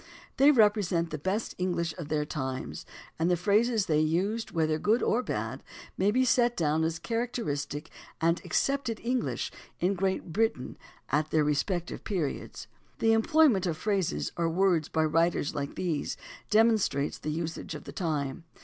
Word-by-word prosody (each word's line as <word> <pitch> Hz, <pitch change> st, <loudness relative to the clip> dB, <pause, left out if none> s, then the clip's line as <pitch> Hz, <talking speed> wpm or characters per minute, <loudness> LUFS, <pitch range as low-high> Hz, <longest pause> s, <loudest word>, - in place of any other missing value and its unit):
They 275 Hz, +2 st, +7 dB
represent 205 Hz, -, +3 dB
the 155 Hz, -, -4 dB
best 195 Hz, +8 st, -2 dB
English 170 Hz, -3 st, -1 dB
of 170 Hz, -5 st, -7 dB
their 150 Hz, -1 st, 0 dB
times, 130 Hz, -, -5 dB, 0.3 s
and 165 Hz, +2 st, +2 dB
the 175 Hz, -, +3 dB
phrases 210 Hz, +4 st, +2 dB
they 155 Hz, -3 st, +2 dB
used, 185 Hz, +9 st, 0 dB
whether 155 Hz, -2 st, 0 dB
good 220 Hz, +7 st, +2 dB
or 240 Hz, -, +2 dB
bad, -, -, -4 dB, 0.3 s
may 195 Hz, -, +2 dB
be 255 Hz, +5 st, +3 dB
set 240 Hz, -1 st, +3 dB
down 160 Hz, -1 st, +1 dB
as 165 Hz, 0 st, 0 dB
characteristic 165 Hz, -, -3 dB, 0.3 s
and 165 Hz, +2 st, +2 dB
accepted 275 Hz, -5 st, 0 dB
English 250 Hz, +1 st, -1 dB, 0.3 s
in 185 Hz, +3 st, +2 dB
Great 190 Hz, -3 st, -2 dB
Britain 220 Hz, -, 0 dB, 0.3 s
at 155 Hz, +1 st, +1 dB
their 155 Hz, 0 st, +3 dB
respective 170 Hz, +4 st, -1 dB
periods. 175 Hz, -9 st, -3 dB, 0.3 s
The 225 Hz, 0 st, +3 dB
employment 225 Hz, -, +4 dB
of 165 Hz, -3 st, -2 dB
phrases 185 Hz, -, -1 dB
or 170 Hz, -1 st, +1 dB
words 175 Hz, -2 st, +2 dB
by 160 Hz, 0 st, +1 dB
writers 165 Hz, -1 st, +1 dB
like 140 Hz, -1 st, -4 dB
these 165 Hz, -6 st, -2 dB, 0.3 s
demonstrates 215 Hz, -10 st, +2 dB
the 155 Hz, -, -4 dB
usage 160 Hz, 0 st, -4 dB
of 150 Hz, -, -8 dB
the -, -, -8 dB
time. 155 Hz, -2 st, -2 dB
175 Hz, 160 wpm, -29 LUFS, 155-215 Hz, 0.3 s, They